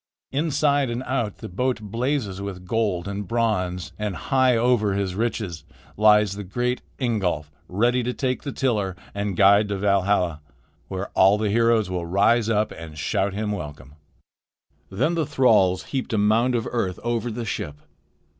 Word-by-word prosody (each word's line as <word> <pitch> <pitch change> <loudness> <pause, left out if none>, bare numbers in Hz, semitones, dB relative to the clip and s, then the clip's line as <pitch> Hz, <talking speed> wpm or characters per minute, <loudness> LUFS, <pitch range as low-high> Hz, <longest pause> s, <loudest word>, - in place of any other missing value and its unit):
Inside 145 -2 +1
and 120 +2 -3
out 120 -6 -2
the - - -8
boat 125 +7 -1
blazes 110 -1 -2
with 95 -2 -6
gold 100 -4 -1
and 100 0 -4
bronze, 95 -5 -1
and, 105 -3 -2
high 130 -3 +2
over 115 -4 +2
his 100 -2 -1
riches, 105 -6 -3 0.3
lies 105 -1 +5
the 105 - -6
great 120 +6 -2 0.2
Ingolf, 95 - -1 0.2
ready 120 +7 +1
to 125 +1 -1
take 130 0 -2
the 140 - -5
tiller 105 -10 -1 0.2
and 100 -2 -3
guide 100 +1 +6
to 100 -1 -2
Valhalla, 95 -4 +1 0.5
where 95 +1 -4
all 95 +2 +4
the 105 -1 0
heroes 115 -1 +3
will 90 -2 -3
rise 110 +5 +3
up 105 -1 +1
and 80 -1 -9
shout 95 +5 -1
him 105 0 -2
welcome." 75 -7 -7 1.0
Then 105 - 0
the 160 -4 0
thralls 100 -8 +3
heaped 130 -3 -4
a - - +2
mound 110 +4 +3
of 115 - -1
earth 95 -7 -2
over 120 0 -1
the 115 +1 -4
ship. 75 -8 -4
105 Hz, 165 wpm, -24 LUFS, 95-120 Hz, 1.0 s, guide